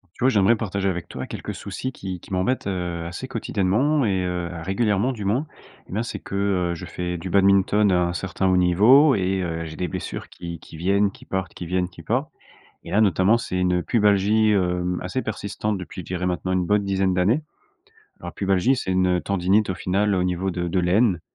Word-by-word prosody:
Tu - - -3
vois, - - +6
j'aimerais 110 -1 +4
partager 100 -3 -2
avec 85 -2 -5
toi 65 - -6
quelques - - -6
soucis 130 - -5
qui 95 -7 -7
qui - - -12
m'embêtent, 95 +8 0
heu, 90 -3 -3
assez 85 +1 -6
quotidiennement 125 +10 +1
et 95 -4 +1
heu, 90 -1 -3
régulièrement 105 +5 +1
du 105 -5 -6
moins. 120 +10 0 0.4
Eh - - -13
bien, 105 +4 0
c'est 120 - -5
que, - - -9
heu, 95 -3 0
je 85 - -8
fais 90 0 -4
du 85 +2 -6
badminton, 100 +2 +4
à 90 -1 +2
un - - -2
certain 95 +1 -2
haut 95 - +3
niveau 110 - +6
et 95 -1 0
heu, 85 -1 -3
j'ai 80 -1 -8
des 90 - -2
blessures - - -5
qui 85 -1 -8
qui 80 - -12
viennent, 100 +4 +2
qui - - -16
partent, 95 -2 -4
qui - - -7
viennent, 90 +1 0
qui 85 -3 -13
partent 130 - -1 0.6
et - - -8
là 105 - +3
notamment, 100 +1 +4
c'est 95 -5 -4
une 90 -1 +1
pubalgie, 105 +1 +3
hem, 90 -2 0
assez 110 +9 -2
persistante 105 -1 -3
depuis 90 0 -7
je - - -13
dirais 90 +1 -3
maintenant 90 +1 -2
une 90 -1 +1
bonne 105 +2 +2
dizaine 95 -1 +1
d'années. 100 +11 +2 0.8
Alors - - -7
pubalgie, 100 +6 +2
c'est 95 - -3
une, 95 0 +2
heu, - - -3
tendinite 100 +5 +1
au - - -1
final 100 +4 0
au 90 - +1
niveau 90 +1 -1
de 90 -1 -3
de 90 - 0
l'aine, 90 +1 +2
95 Hz, 215 wpm, -23 LUFS, 90-105 Hz, 0.8 s, vois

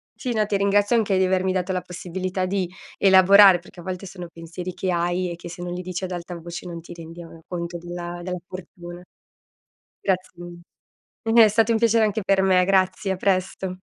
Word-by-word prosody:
Sì, 250 -3 -3
no, 215 -1 +1
ti 200 - +1
ringrazio 205 +3 +2
anche 210 -4 +2
di 190 - +3
avermi 185 0 +1
dato 185 0 -1
la 185 -1 -1
possibilità 185 +1 -4
di 190 -1 -1 0.3
elaborare, 190 -1 +7
perché 175 0 -14
a - - -13
volte 185 +1 -5
sono 180 -2 -8
pensieri 170 +2 -7
che 185 -1 -2
hai, 175 +1 0
e - - -5
che 170 - -10
se 175 +1 -9
non 175 0 -4
li 180 - -4
dici 185 +1 -5
ad 185 - -7
alta 175 0 -6
voce 170 +2 -8
non 170 -1 -7
ti - - -14
rendi 165 0 -10 0.3
conto, 175 -1 -5
uhm, - - -13
della 175 0 -6
della 180 0 -4
fortuna. 175 -1 -10 1.0
Grazie 185 -1 -1
mille. 175 0 -13 0.6
È - - +5
stato 225 +2 +2
un 225 - +3
piacere 230 0 +3
anche 215 +1 -1
per 195 0 +2
me. 185 -1 +4
Grazie, 190 +1 +1
a - - 0
presto. 185 -1 -1
185 Hz, 210 wpm, -23 LUFS, 175-195 Hz, 1.0 s, elaborare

